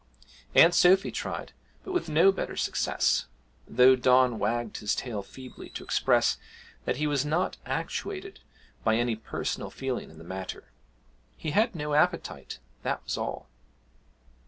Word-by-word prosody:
Aunt 170 +1 +8
Sophy 190 +3 +5
tried, - - -5 0.3
but 380 - -6
with 360 - -1
no 165 +6 +6
better 195 - -4
success, - - +1 0.4
though 130 +1 +6
Don 125 -2 +4
wagged 120 0 -1
his 105 - -1
tail 115 -5 -3
feebly 130 +6 -11
to - - -5
express - - +2 0.5
that - - 0
he 150 - 0
was 145 -2 +1
not 160 +5 0
actuated 390 -1 -4 0.4
by 110 -1 +3
any 120 0 +1
personal 110 - -4
feeling 130 -2 -4
in 80 - -15
the 80 - -11
matter 95 -7 -7 0.7
he 155 - -4
had 220 +5 +2
no 150 -2 -3
appetite, 150 - 0 0.2
that - - -2
was - - -3
all. - - -4
130 Hz, 145 wpm, -28 LUFS, 115-170 Hz, 0.7 s, Aunt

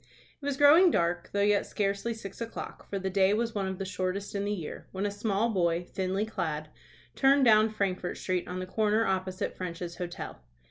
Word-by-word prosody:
It - - -8
was 280 -1 -1
growing 310 +6 +7
dark, 175 - 0
though 200 - 0
yet 205 0 +3
scarcely 200 +3 -1
six 200 -1 -9
o'clock, 230 0 -7
for 200 - -2
the 190 0 -3
day 195 +1 +4
was 230 +1 -1
one 195 -2 -1
of 190 0 -4
the 195 - -4
shortest 190 +1 -3
in 200 0 -1
the 205 - -1
year, 175 -7 -5
when 195 +2 -2
a 205 - 0
small 210 +2 0
boy, 170 -3 +1
thinly 190 +3 -2
clad, 155 -8 -3 0.5
turned 270 0 +5
down 215 -1 +6
Frankfort 190 -4 -2
Street 180 -1 -2
on 180 +1 -4
the 185 - -3
corner 215 +3 +1
opposite 190 0 -2
French's 170 -1 -5
Hotel. 175 - -6
195 Hz, 200 wpm, -29 LUFS, 185-215 Hz, 0.5 s, growing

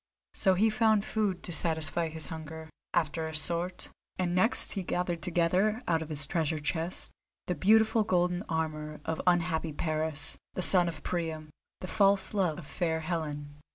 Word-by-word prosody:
So 190 -2 +2
he 220 +4 +3
found 215 -2 +2
food 205 -5 -1
to - - -6
satisfy 165 0 +1
his 160 -1 -4
hunger, 160 0 -8 0.2
after 160 0 0
a 160 - -7
sort, 175 +3 -3 0.3
and 180 -1 -1
next 185 +7 +3
he 195 - -2
gathered 175 -1 -2
together 180 +5 +1
out 165 -2 +1
of 160 - -6
his 145 -2 +1
treasure 160 +1 -1
chest 160 +3 -3 0.3
the 180 - -1
beautiful 220 +6 +4
golden 180 -2 +1
armour 155 -2 -3
of 160 - -2
unhappy 170 -3 +1
Paris, 155 -1 -2 0.2
son 180 -1 +7
of 155 -3 -6
Priam, 160 -3 -3 0.3
the 185 - -5
false 195 +1 +2
love 185 -7 +1
of 175 - -9
fair 160 +1 -2
Helen. 150 -3 -4
170 Hz, 160 wpm, -29 LUFS, 160-185 Hz, 0.3 s, son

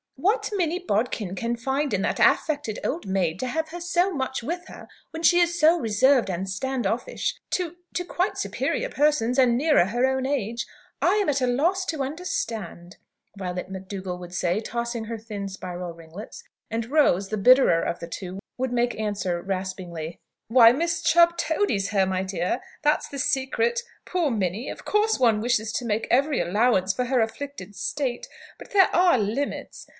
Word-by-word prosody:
"What 395 - 0
Minnie 350 -2 0
Bodkin 215 - -1
can 235 +5 -2
find 270 +3 -1
in 195 - -1
that - - -1
affected 290 -8 +2
old 330 - -2
maid, 185 -3 0
to 255 - -2
have 315 +4 -2
her 345 +2 -7
so 350 +2 +1
much 265 -4 -3
with 350 +7 -4
her - - -11 0.2
when 325 +1 -7
she 350 +1 +6
is 345 0 +2
so 325 +3 +5
reserved 235 0 +3
and 185 +1 -3
stand 260 +7 -2
offish - - -2
to 350 -2 -1 0.2
to 360 - -1
quite 365 +2 -1
superior - - -1
persons, 280 - +2
and 240 -2 +4
nearer 295 - +4
her 240 +6 +1
own 265 0 0
age, 235 -4 -2 0.3
I 360 +4 +4
am 410 -6 +1
at 275 -2 +1
a 255 - +2
loss 340 +10 +1
to 310 -4 -1
understand!" 225 - -4 0.4
Violet 185 -1 -5
McDougall 190 -1 -6
would 175 0 -10
say, 180 +2 0
tossing 235 0 -3
her 230 +1 -5
thin 210 -2 -6
spiral 180 -2 -6
ringlets. 170 - -10 0.3
And 225 0 -2
Rose, 200 - +3
the 215 - -2
bitterer 235 -6 +5
of 170 - -2
the 170 - -6
two, 185 +2 -6 0.2
would 260 -1 -1
make 240 -1 0
answer, 195 -5 -2
raspingly: 185 -4 -5 0.3
"Why, 230 -1 +8
Miss 330 +5 -1
Chubb 340 0 +5
toadies 305 - 0
her, 195 -3 +2
my 185 0 -1
dear. 185 +3 -2 0.2
That's 295 +1 +2
the 280 - -7
secret. 275 - +1 0.2
Poor 350 -5 0
Minnie! 205 +2 -2
Of - - -8
course 430 +1 +2
one 225 -4 +3
wishes 225 -2 0
to 250 - -2
make 220 0 -1
every 280 +3 +3
allowance 195 -1 +2
for 250 - -1
her 250 -1 +2
afflicted 225 -4 -5
state; 245 +5 -3 0.3
but - - -12
there 390 -2 +4
are 355 -5 +5
limits. 230 +7 -3
240 Hz, 180 wpm, -25 LUFS, 195-305 Hz, 0.4 s, Why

